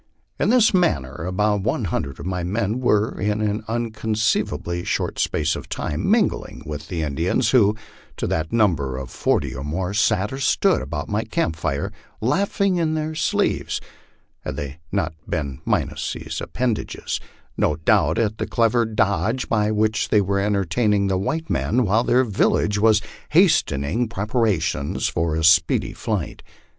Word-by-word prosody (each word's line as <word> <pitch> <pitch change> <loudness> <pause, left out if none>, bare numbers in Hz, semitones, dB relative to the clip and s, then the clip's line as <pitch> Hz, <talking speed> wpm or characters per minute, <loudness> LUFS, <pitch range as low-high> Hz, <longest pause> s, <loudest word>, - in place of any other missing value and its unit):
In - - +2
this 240 -3 +5
manner 75 - +1
about 105 +2 +1
one 115 +4 -1
hundred 70 -5 -3
of - - -7
my 90 -1 -2
men 105 +5 -1
were, 110 -4 +2
in 105 +1 0
an 105 0 -1
inconceivably 110 -6 -1
short - - -2
space 80 0 +1
of - - -8
time, - - -2
mingled - - 0
with 75 -1 -6
the 85 -3 -3
Indians, 80 +5 0
who, 110 -5 +4 0.4
to - - -2
the 80 -1 -1
number 80 - +1
of 65 -2 -6
forty - - 0
or 65 - -6
more, 90 +6 -2
sat 105 +1 +1
or 135 - -5
stood 130 - +2
about - - -4
my - - -1
camp 80 - -1
fire, 75 -3 -2 0.3
laughing 195 - +1
in 160 -2 +1
their 155 0 -2
sleeves 155 - 0 0.6
(had - - -5
they 70 +2 -6
not - - -1 0.2
been 70 -6 -3
minus - - -1
these - - -6
appendages), 120 -2 -2 0.4
no 75 - +1
doubt, 80 - +2
at 110 -1 0
the - - -2
clever 115 0 +2
dodge 105 +2 0
by 105 -2 +2
which 110 0 +1
they 105 - +4
were 100 0 0
entertaining 100 +1 +1
the 95 - +1
white 160 +12 -2
men 125 +2 +1
while 110 +4 +2
their 125 +1 +3
village 105 -2 +1
was 110 0 +4 0.3
hastening 75 - +2
prep 105 -1 -4
arations 85 - 0
for 80 -1 0
a 80 - -1
speedy 80 0 +4
flight. - - -3
105 Hz, 160 wpm, -22 LUFS, 80-115 Hz, 0.6 s, this